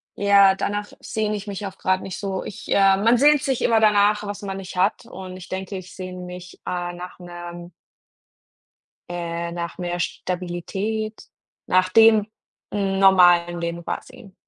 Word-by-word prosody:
ja, 200 -1 +5
danach 205 +1 -3
sehne 215 -1 -2
ich 205 +1 -9
mich 200 0 -5
auch 195 -1 -7
gerade 185 0 0
nicht 190 - -6
so. 195 -2 -3
Ich, 200 - -9
äh 195 -1 +5
man 230 +4 +4
sehnt 290 +1 +5
sich 265 -3 -1
immer 225 -1 +3
danach, 210 -1 +4
was 205 +1 -5
man 195 -1 -5
nicht 190 -1 -8
hat 195 +5 +1
und 185 -3 -9
ich 180 - -11
denke, 190 +1 -5
ich 185 0 -10
sehne 185 -1 -7
mich, 180 0 -9
äh, 175 -1 -3
nach 180 +1 -9
'nem 175 0 -9 1.4
äh, 170 -1 -4
nach 170 -1 -5
mehr 175 -1 -3
Stabilität, 190 +6 -3 0.4
nach 185 0 +3
dem 220 0 +6 0.4
normalen 185 -3 +4
Leben 170 0 -4
quasi. 240 -3 -7
190 Hz, 155 wpm, -23 LUFS, 175-205 Hz, 1.4 s, dem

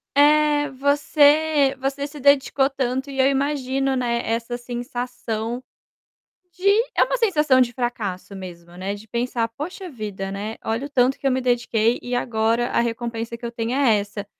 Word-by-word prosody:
é, 295 0 +4
você 290 +1 +3
você 275 +1 -2
se 295 0 -11
dedicou 275 0 +3
tanto, 265 0 -2
e 270 -1 -6
eu 265 - +5
imagino, 270 -1 0
né, 240 -2 0
essa 230 +1 -2
sensação 240 -1 -4 0.9
de 370 +3 -3 0.3
é - - +5
uma - - -1
sensação 305 - +3
de 245 -1 +2
fracasso 220 -7 -4
mesmo, 175 -2 -10
né, 195 +2 -3
de 210 +2 -13
pensar: 235 0 -1
"Poxa 350 - -7
vida, 205 - -5
né, 210 +3 -4
olha 230 +5 -2
o - - -23
tanto 260 -1 +2
que 275 - -1
eu 270 - +3
me 260 - 0
dediquei 240 -2 +1
e 245 0 -3
agora 230 0 +1
a - - +1
recompensa 235 0 -3
que 235 - -9
eu 235 - -4
tenho 230 0 -3
é 260 -6 +4
essa". 205 0 -6
245 Hz, 170 wpm, -22 LUFS, 230-280 Hz, 0.9 s, eu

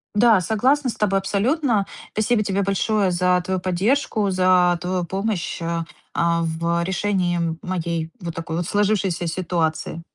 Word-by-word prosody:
Да, 220 -1 +5
согласна 255 - +1
с - - -3
тобой 195 -2 +1
абсолютно. 215 +2 +1 0.3
Спасибо 215 +1 +1
тебе 200 -1 0
большое 200 0 +1
за 180 +1 +2
твою 185 0 -1
поддержку, 200 +3 0
за 185 -1 +4
твою 180 0 -1
помощь, 190 -1 -3
а 165 0 -2 0.3
а, 170 0 +2
в 170 +1 -1
решении 175 -4 0
моей 170 -3 -3
вот 170 -1 -5
такой 165 0 -5
вот 175 - -1
сложившейся 195 -3 0
ситуации. 165 -2 -2
185 Hz, 140 wpm, -22 LUFS, 170-205 Hz, 0.3 s, Да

